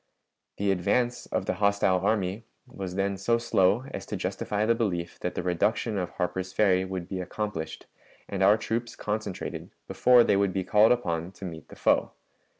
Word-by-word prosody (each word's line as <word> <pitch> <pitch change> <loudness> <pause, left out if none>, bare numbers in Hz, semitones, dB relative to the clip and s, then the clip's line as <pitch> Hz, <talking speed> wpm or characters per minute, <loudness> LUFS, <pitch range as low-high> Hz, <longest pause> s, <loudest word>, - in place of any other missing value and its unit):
The 100 0 +1
advance 120 +7 0
of - - -2
the - - 0
hostile 100 -2 +3
army 100 +1 0 0.2
was 95 -7 -7
then 100 0 0
so 115 +5 +2
slow 115 0 +2
as - - -5
to - - -4
justify 105 +1 -2
the 115 - +4
belief 90 -7 -2
that 90 - -3
the - - -2
reduction 100 +4 0
of 90 - -2
Harper's 95 +1 -2
Ferry 95 -3 +3
would 95 -2 -5
be 95 -1 -4
accomplished 90 -3 -5 0.4
and 100 -1 -4
our 100 +3 +6
troops 115 +2 -3
concentrated 105 -3 -4 0.2
before 125 -1 +5
they 100 - +3
would 100 -2 +1
be 95 - -1
called 105 +4 +5
upon 85 -8 0
to 95 - -9
meet 80 -4 -8
the - - -13
foe. - - +2
100 Hz, 180 wpm, -27 LUFS, 90-110 Hz, 0.4 s, our